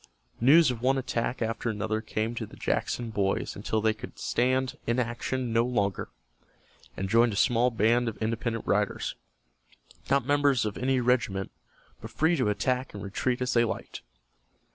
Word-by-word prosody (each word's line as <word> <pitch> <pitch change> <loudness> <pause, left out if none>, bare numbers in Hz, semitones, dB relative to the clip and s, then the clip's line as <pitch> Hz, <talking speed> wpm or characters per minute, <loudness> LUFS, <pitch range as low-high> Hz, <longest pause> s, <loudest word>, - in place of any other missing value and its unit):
News 140 +4 +6
of 120 -2 -6
one 135 +2 +2
attack 120 -1 -2
after 115 +1 -2
another 110 0 -2
came 110 +1 -2
to 115 -2 -5
the - - -14
Jackson 120 -2 -2
boys 100 -2 -1
until 110 +2 -1
they 110 0 +2
could 110 - -10
stand 130 +1 0
inaction 120 +1 -1
no 115 0 +4
longer, 100 -6 -1 0.9
and 95 - -2
joined 115 +2 +4
a - - -4
small 120 +3 +3
band 115 +1 +2
of 110 - -8
independent 115 +1 -2
riders, 105 -1 0 1.0
not 135 -2 +2
members 145 -4 +3
of 105 -1 -3
any 130 +1 +1
regiment, 120 -6 0 0.5
but 110 - -7
free 160 +9 +2
to 125 -8 +1
attack 125 +4 -1
and 100 - -6
retreat 120 +6 -1
as 125 - -1
they 120 - +4
liked. 115 - -4
115 Hz, 165 wpm, -28 LUFS, 110-125 Hz, 1.0 s, News